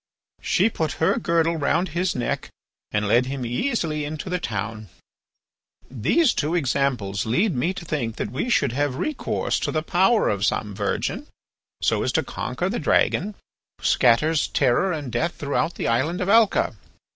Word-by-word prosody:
She - - +2
put 160 -8 -2
her 160 - +1
girdle 165 0 +1
round 165 +5 +1
his 175 +1 -1
neck 120 - -2 0.4
and 105 0 0
led 120 +5 +3
him 135 -2 -4
easily 155 - -1
into 155 +4 -5
the 180 - 0
town. 110 - -4 1.0
"These 185 - +2
two 155 +3 -1
examples 125 - 0
lead 175 - +1
me 145 +9 0
to 175 - -7
think 120 -9 -2
that 105 - -4
we 135 - -2
should 140 - +2
have 140 +1 -1
recourse 300 - -1
to - - -2
the 155 -1 -1
power 190 +7 +3
of 100 -1 0
some 105 0 0
virgin 110 - -2 0.6
so - - +2
as - - 0
to - - +2
conquer - - -3
the - - -2
dragon 210 0 +1 0.4
who - - -21
scatters 145 +6 +3
terror 135 +8 +2
and 145 -6 -4
death 160 +9 -1
through 145 +2 -1
the - - -2
island 135 +10 0
of 185 - -1
Alca. 220 - +4
145 Hz, 170 wpm, -23 LUFS, 120-175 Hz, 1.0 s, Alca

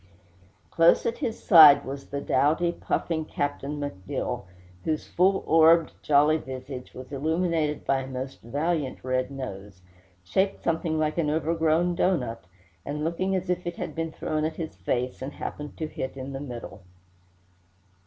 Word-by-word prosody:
Close 165 0 +4
at 230 - -1
his 235 -6 -2
side 150 -5 +9
was 135 +1 -6
the 140 - -3
doughty, 155 +6 +2
puffing 165 -1 -2
Captain 145 -1 -3
McDill, 95 -11 -4 0.4
whose 155 -1 -1
full 190 +2 +2
orbed, 165 +1 +5
jolly 150 +2 +4
visage 130 -2 -8
was 130 +1 -9
illuminated 160 +1 0
by 135 - +2
a 130 - -6
most 130 0 -6
valiant 145 +3 -2
red 130 0 0
nose, 100 -9 -8 0.4
shaped 190 - 0
something 165 -1 0
like 155 +1 0
an 155 -3 +1
overgrown 160 +2 +1
doughnut, 155 - 0 0.4
and 150 +1 -4
looking 185 +4 0
as 185 0 -2
if 180 0 -2
it 175 - -3
had - - -4
been 165 0 -3
thrown 155 0 -2
at 160 +1 -1
his 160 - -6
face, 120 +9 -2
and 135 +2 -5
happened 150 0 -6
to 160 - -2
hit 135 -3 -5
in 135 +1 -6
the 135 - -5
middle. 120 -7 -8
150 Hz, 155 wpm, -26 LUFS, 130-165 Hz, 0.4 s, side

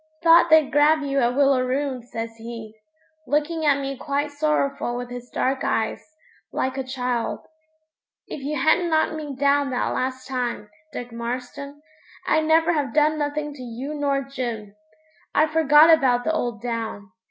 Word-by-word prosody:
'Thought 335 0 +6
they'd 315 -2 +5
grab 300 +1 +4
you 275 -1 0
at 245 -1 +1
Willaroon,' 270 -1 +1
says 225 -1 -6
he, 225 -1 -8 0.5
looking 305 +3 0
at 280 -1 +4
me 275 0 -4
quite 285 +2 -2
sorrowful 285 -4 -1
with 245 0 -6
his 245 0 -8
dark 265 +1 -1
eyes, 220 -1 -1 0.5
like 260 0 -2
a 265 - -2
child. 250 -2 -3 0.8
'If 290 - -7
you 295 +2 -3
hadn't 340 +5 +3
knocked 315 0 +2
me 300 -3 -6
down 280 +1 +2
that 250 -1 -1
last 260 0 -3
time, 245 -5 -3 0.2
Dick 245 0 -7
Marston, 250 +5 -6 0.4
I'd 315 0 +2
never 325 +2 +3
have 285 -6 -2
done 305 0 +3
nothing 295 0 -2
to 280 - -11
you 250 +4 -6
nor 280 -2 0
Jim. 235 -6 -5 0.6
I 305 - +5
forgot 310 0 +5
about 260 -6 +3
the 320 - 0
old 240 -8 -3
down. 225 -4 -4
275 Hz, 160 wpm, -23 LUFS, 245-300 Hz, 0.8 s, Thought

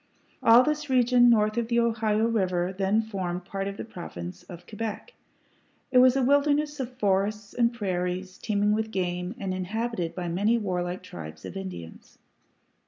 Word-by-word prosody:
All 235 +2 +7
this 300 0 -2
region 245 -1 +5
north 215 -1 +3
of 235 -1 0
the 235 0 +2
Ohio 225 -2 +1
River 185 -5 0
then 200 +3 +1
formed 185 -5 -4
apart 195 0 -4
of 200 0 -5
the - - -5
Province 90 - -8
of 175 -1 -12
Quebec. 220 - -6 0.8
It 255 - +6
was 255 0 +6
a 270 - +2
wilderness 290 +2 +2
of 250 -1 -5
forests 205 0 0
and 235 -1 +2
prairies, 185 -4 -3
teeming 205 -1 +1
with 220 +1 0
game, 180 0 -2
and 195 -2 -3
inhabited 185 -1 -3
by 180 -1 -4
many 205 +7 +2
warlike 180 -4 -3
tribes 80 -1 -9
of - - -8
Indians. 185 - -8
210 Hz, 165 wpm, -27 LUFS, 185-235 Hz, 0.8 s, All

